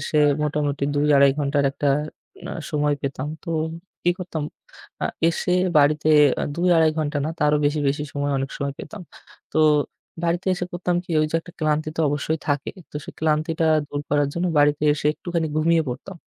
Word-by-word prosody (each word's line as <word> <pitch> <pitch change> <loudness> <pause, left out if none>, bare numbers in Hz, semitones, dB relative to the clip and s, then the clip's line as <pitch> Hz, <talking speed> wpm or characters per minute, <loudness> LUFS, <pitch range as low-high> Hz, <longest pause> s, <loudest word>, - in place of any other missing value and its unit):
এসে - - -3 0.3
মোটামুটি 145 -1 -1
২-২.৫ 145 -1 +5
ঘণ্টার 145 0 +1
একটা 145 - -3 0.6
না - - -5 0.2
সময় 150 -1 +1
পেতাম। 135 +1 -3 0.2
তো - - -10 0.5
কি 175 - +3
করতাম? 170 -4 -4 0.6
আ - - +2 0.2
এসে 170 +2 -1 0.3
বাড়িতে 150 +1 +3 0.3
আ - - +1
২-২.৫ 170 -2 +4
ঘণ্টা 150 -1 -1
না - - -1
তারও 150 0 +3
বেশি, 145 +1 +1
বেশি 145 +2 -1
সময় 145 0 -1
অনেক 135 +1 -3
সময় 140 -1 -3
পেতাম। 210 - -8 0.5
তো - - +1 0.7
বাড়িতে 170 +2 -1
এসে 180 - -3
করতাম 175 0 -1
কি? - - -13
ওই 155 - +2
যে - - -8
একটা 175 - -14
ক্লান্তি 155 0 0
তো - - 0
অবশ্যই 145 +2 -1
থাকে। 145 -1 0 0.2
তো - - -6
সেই - - -10
ক্লান্তিটা 160 +1 +1 0.2
দূর 145 - -3
করার 145 -1 +2
জন্য 175 +2 0
বাড়িতে 145 0 +3
এসে 150 - -3
একটুখানি 170 -1 -2
ঘুমিয়ে 165 +1 +3
পড়তাম। 140 +9 -6
150 Hz, 175 wpm, -23 LUFS, 145-165 Hz, 0.7 s, ২-২.৫